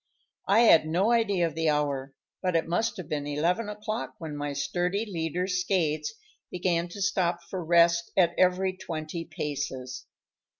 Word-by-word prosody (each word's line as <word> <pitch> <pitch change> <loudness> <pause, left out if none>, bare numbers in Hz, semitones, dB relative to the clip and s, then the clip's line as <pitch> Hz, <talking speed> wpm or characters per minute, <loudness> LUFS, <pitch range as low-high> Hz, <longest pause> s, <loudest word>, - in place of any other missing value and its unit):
I 205 +4 +5
had 165 -9 +6
no 185 +8 +2
idea 205 -7 +2
of 165 - -3
the 160 0 +1
hour, 140 -2 -1 0.3
but 180 -2 0
it 165 - +1
must 220 +7 0
have 180 -5 -7
been 145 -1 -3
eleven 175 +9 0
o'clock 215 +2 -4
when 160 -6 -6
my 145 0 -3
sturdy 180 +8 -1
leader, 175 -2 -2
Skates, 180 - 0 0.3
began 175 -1 0
to 200 +3 -8
stop 180 -3 0
for 185 -2 -3
rest 170 0 +4
at 175 -2 +4
every 185 +1 +2
twenty 165 -1 -5
paces. 130 -3 -5
170 Hz, 160 wpm, -28 LUFS, 155-190 Hz, 0.3 s, had